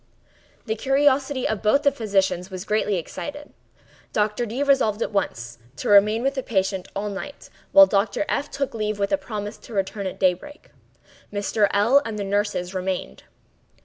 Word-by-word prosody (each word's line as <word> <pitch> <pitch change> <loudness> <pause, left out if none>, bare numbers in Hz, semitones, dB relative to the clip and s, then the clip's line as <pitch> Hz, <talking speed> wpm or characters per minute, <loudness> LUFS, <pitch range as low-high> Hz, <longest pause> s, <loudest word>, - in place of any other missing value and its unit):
The 220 - -1
curiosity 270 +2 +1
of 220 - -2
both 250 +7 +3
the 280 - +4
physicians 195 -5 0
was 185 0 -7
greatly 210 -1 +1
excited. 290 - -6 0.6
Dr. 210 +3 0
D—— 245 +6 -2
resolved 265 -6 +2
at - - -4
once 120 - -3 0.2
to - - -4
remain 210 +3 +5
with 275 +1 +1
the 270 - -2
patient 190 -5 -1
all 200 +2 -2
night, 205 +8 -7 0.2
while 295 0 +9
Dr. 200 +4 0
F—— 285 - -1
took 275 -2 -3
leave 215 -2 -2
with 200 -1 -1
a 295 - +3
promise 210 -1 -6
to 230 - -11
return 195 0 -2
at 185 - -7
daybreak. 190 - -1 0.6
Mr. 205 +1 +1
L—l 235 +8 +4
and 225 -4 -5
the 205 - -2
nurses 195 -2 -1
remained. 185 - -4
210 Hz, 170 wpm, -23 LUFS, 195-260 Hz, 0.6 s, while